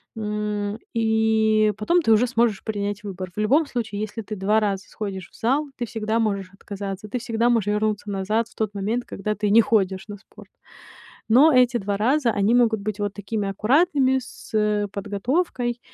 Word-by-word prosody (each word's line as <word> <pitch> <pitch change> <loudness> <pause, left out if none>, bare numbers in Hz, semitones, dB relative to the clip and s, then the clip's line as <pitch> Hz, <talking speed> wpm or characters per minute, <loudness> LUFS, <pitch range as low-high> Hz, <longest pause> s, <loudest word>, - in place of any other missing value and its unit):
М, 210 -1 -3
и 220 -1 +2
потом 345 +11 +2
ты 225 - +2
уже 230 +3 +3
сможешь 230 -4 +1
принять 205 -1 -3
выбор. 190 -2 -6
В - - -5
любом 270 +10 +3
случае, 225 -6 -4
если 215 +1 -4
ты 215 +1 -6
2 210 +3 +2
раза 195 -2 -1
сходишь 195 -3 -6
в - - -22
зал, 270 +6 +1
ты 240 - -2
всегда 220 0 -2
можешь 200 -4 -1
отказаться, 200 0 -7
ты 250 - -2
всегда 235 0 0
можешь 230 -4 +1
вернуться 210 0 -1
назад 210 +4 0
в - - -23
тот 215 -2 -2
момент, 215 +5 -1
когда 210 +2 -3
ты 210 0 -1
не 220 +3 +6
ходишь 195 -3 0
на 205 -1 -7
спорт. 205 - -17 0.8
Но 270 +8 +6
эти 250 -2 +4
2 200 -1 -2
раза, 250 +4 +2
они 205 +1 +2
могут 235 -3 +3
быть 210 +1 -4
вот 205 -1 -2
такими 205 0 -3
аккуратными, 265 - +2
с, 250 -2 -13
э, 210 -1 +1
подготовкой 240 - -2
215 Hz, 185 wpm, -23 LUFS, 205-235 Hz, 0.8 s, не